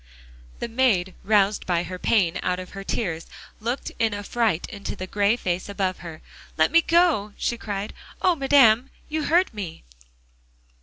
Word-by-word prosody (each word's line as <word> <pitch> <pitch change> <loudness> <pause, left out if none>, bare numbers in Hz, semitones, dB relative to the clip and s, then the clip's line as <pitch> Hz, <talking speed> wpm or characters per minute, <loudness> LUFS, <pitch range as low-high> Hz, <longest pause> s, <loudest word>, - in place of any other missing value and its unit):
The - - -4
maid 225 -7 +1
roused 205 -1 +2
by 175 -2 +1
her 185 +1 -7
pain 180 -7 +2
out 180 - 0
of 185 0 -8
her 195 0 -7
tears 175 -6 -3 0.3
looked 240 +5 -3
in 225 -2 +1
affright 205 -3 -1
into 200 -3 -6
the 185 - -5
gray 205 +3 +2
face 185 -5 -3
above 195 -2 -2
her. 165 -3 -9 0.3
"Let 155 +7 +3
me 335 +1 +6
go," 330 - +2
she 240 - -1
cried. 205 -3 -5 0.3
"Oh! 370 - +3
madame, 270 -4 +5 0.2
you 310 -1 -2
hurt 350 0 +3
me." 195 - -7
205 Hz, 160 wpm, -24 LUFS, 185-240 Hz, 0.3 s, me